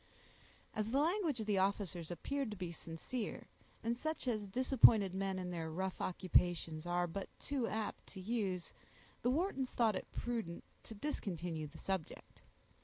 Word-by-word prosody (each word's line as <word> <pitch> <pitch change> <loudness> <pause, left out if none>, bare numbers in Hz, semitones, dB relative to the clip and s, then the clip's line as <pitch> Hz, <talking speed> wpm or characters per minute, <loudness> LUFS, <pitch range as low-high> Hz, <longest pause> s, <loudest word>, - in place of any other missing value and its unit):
As 215 0 -1
the 260 - +2
language 325 - +2
of - - -2
the 205 -2 +3
officers 190 -4 0
appeared 275 +9 -2
to 210 - -5
be 180 -2 -3
sincere, 170 +8 -4 0.4
and 230 +1 +1
such 310 +2 -2
as 215 -4 0
disappointed 220 -4 +6
men 195 0 0
in 180 -1 -3
their 165 -2 -2
rough 185 +3 -2
occupations 175 -3 +2
are 175 0 +2
but 185 +3 -4
too 275 -5 0
apt 215 -2 -3
to 190 - -8
use, 190 -3 -1 0.5
the 245 - +2
Whartons 275 -3 +1
thought 225 -4 +3
it - - -5
prudent 225 -8 -3 0.2
to 220 - -8
discontinue 175 - -2
the 155 +2 -12
subject. 190 -3 -4
200 Hz, 160 wpm, -37 LUFS, 175-240 Hz, 0.5 s, disappointed